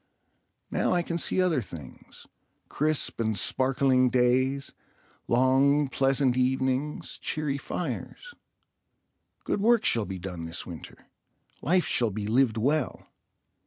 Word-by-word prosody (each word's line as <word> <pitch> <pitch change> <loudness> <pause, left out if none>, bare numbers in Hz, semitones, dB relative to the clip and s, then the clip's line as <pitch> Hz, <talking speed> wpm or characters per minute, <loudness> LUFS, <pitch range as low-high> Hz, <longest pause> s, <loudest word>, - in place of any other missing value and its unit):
Now - - +1
I 175 -1 +1
can 170 0 -3
see 185 - 0
other 175 -7 +2
things—crisp 110 - -4
and 110 -2 0
sparkling 130 +3 +2
days, 130 +3 +1 0.5
long 135 +3 +3
pleasant 135 -1 +1
evenings, 130 +3 -1
cheery 150 -3 -2
fires. - - -5 1.1
Good - - -1
work 230 +1 +3
shall 115 -3 +2
be 95 0 -5
done 90 -2 -6
this 80 +2 -5
winter. 85 -3 -11 0.6
Life 180 +3 +2
shall 120 -2 +1
be 105 0 -4
lived 115 +1 +2
well. 140 +4 -1
130 Hz, 115 wpm, -27 LUFS, 115-145 Hz, 1.1 s, long